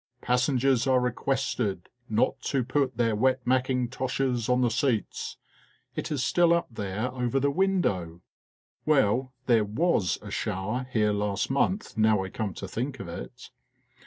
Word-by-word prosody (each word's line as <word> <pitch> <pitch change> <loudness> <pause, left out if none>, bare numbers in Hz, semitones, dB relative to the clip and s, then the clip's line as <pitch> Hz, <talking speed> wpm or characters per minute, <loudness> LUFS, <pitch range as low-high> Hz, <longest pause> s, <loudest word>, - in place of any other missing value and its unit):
(" 125 - -46
Passengers 125 +1 +2
are 130 -1 +4
requested 120 -6 -1 0.2
not 110 +4 +1
to 135 -3 0
put 130 0 0
their 115 -2 +2
wet 130 +3 +1
mack 130 +1 +2
intoshes 125 -1 -1
on 125 0 +3
the 120 - +3
seats," 120 -3 -1 0.6
it - - -4
is 140 -4 0
still 170 +5 +4
up 170 - 0
there 105 +3 -3
over 125 +1 0
the 140 +1 +2
window. 140 - 0 0.6
Well, 130 -3 +2
there 115 -4 +4
was 105 - +1
a - - -8
shower 110 +7 -2
here 105 -3 +2
last 105 +2 -1
month 160 - 0
now 110 -2 +4
I 95 - -5
come 100 -3 -4
to - - -6
think 130 +4 -4
of 100 - -6
it.) 85 - -9
125 Hz, 160 wpm, -27 LUFS, 110-135 Hz, 0.6 s, are